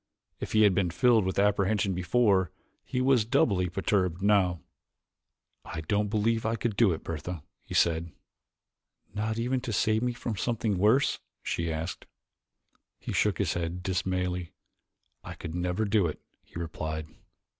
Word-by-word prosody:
If - - -5
he 110 0 +5
had 100 -2 +5
been 90 -1 +1
filled 110 +4 +3
with 95 - -2
apprehension 100 0 +2
before, 95 0 +2 0.3
he 125 - -2
was 130 -3 +4
doubly 105 -7 +2
perturbed 95 -1 0
now. 95 -5 +3 1.0
"I 80 - -6
don't 105 +6 0
believe 110 +2 +1
I 115 +1 0
could 115 -2 -2
do 105 -3 +4
it, 80 - -4
Bertha," 85 0 -5 0.2
he - - -8
said. 85 0 +2 1.0
"Not 110 +2 -2
even 125 +2 0
to 120 - -4
save 110 +2 +2
me 125 0 0
from 115 -3 -4
something 110 -3 -1
worse?" 115 +8 +3 0.2
she 85 -1 -2
asked. 80 +3 -5 0.9
He - - -6
shook - - +2
his - - 0
head 85 +1 -3
dismally. 90 -1 -2 0.7
"I - - -8
could 80 - -7
never 90 +4 -1
do 100 -3 +2
it," 75 - -5 0.2
he - - -13
replied. 80 -1 -4
95 Hz, 155 wpm, -28 LUFS, 90-110 Hz, 1.0 s, he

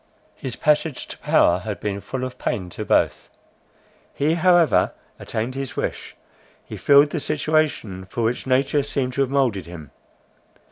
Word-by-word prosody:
His 130 -3 -6
passage 150 -2 +1
to - - -8
power - - +3
had - - -5
been 100 -1 -3
full 130 +4 -5
of 130 0 -6
pain 90 -3 -3
to - - -5
both. - - +1 0.9
He 150 +3 +1
however 175 -1 +4 0.3
attained 115 +4 -3
his 135 -1 -5
wish; - - -4 0.5
he - - -8
filled 145 +1 +5
the 165 - -2
situation 150 -11 -1
for 115 +5 -4
which 120 +3 -1
nature 135 +3 +2
seemed 135 -2 -2
to 140 - 0
have 135 - +1
moulded 125 - 0
him. 80 -5 -10
135 Hz, 155 wpm, -22 LUFS, 110-145 Hz, 0.9 s, filled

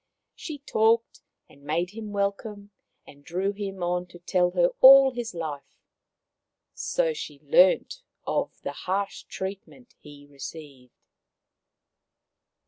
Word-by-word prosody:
She 310 -4 -7
talked 230 -4 +1 0.3
and 140 - -20
made 165 +5 -2
him 215 0 -8
welcome, 200 +1 -3 0.3
and 145 0 -16
drew 185 +6 -2
him 195 -2 -5
on 180 0 -1
to 175 - -14
tell 180 +1 +1
her 175 -1 +2
all 270 0 +9
his 240 -5 -6
life. 155 -4 -6 1.0
So - - -1
she 150 - -8
learnt 185 - +3 0.2
of - - -1
the - - -3
harsh 195 +2 -3
treatment 195 +6 -8
he 145 -1 -14
received. 140 -2 -11
190 Hz, 120 wpm, -26 LUFS, 165-220 Hz, 1.0 s, all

